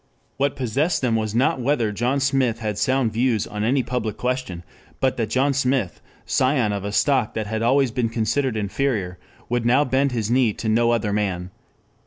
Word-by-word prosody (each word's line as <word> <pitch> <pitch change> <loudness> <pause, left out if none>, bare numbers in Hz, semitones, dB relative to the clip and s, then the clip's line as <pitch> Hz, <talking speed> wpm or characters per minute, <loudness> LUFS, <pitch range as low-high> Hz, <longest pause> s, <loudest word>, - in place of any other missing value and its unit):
What 140 +1 0
possessed 140 +6 0
them 120 -3 +2
was 110 -1 -2
not 135 +5 +2
whether 120 -4 +1
John 120 +6 0
Smith 135 -4 +1
had 105 -3 -3
sound 130 -4 +1
views 115 -2 +1
on 105 -2 -4
any 130 +4 +2
public 120 -4 -3
question, 125 -9 -3 0.4
but 130 -1 +1
that 115 -2 -1
John 135 +4 +2
Smith, 130 -7 0 0.2
scion 130 -5 +1
of 100 -1 -4
a 100 - -3
stock 110 +4 +1
that 110 - -2
had 110 +1 -3
always 130 +2 +3
been 115 0 -1
considered 115 +2 -1
inferior, 100 -4 -2 0.3
would 120 0 -1
now 125 +5 +3
bend 135 +2 +1
his 115 -2 -2
knee 125 -4 +3
to 110 - -5
no 115 +2 +3
other 110 -3 0
man. 95 -3 -2
120 Hz, 190 wpm, -22 LUFS, 110-130 Hz, 0.4 s, always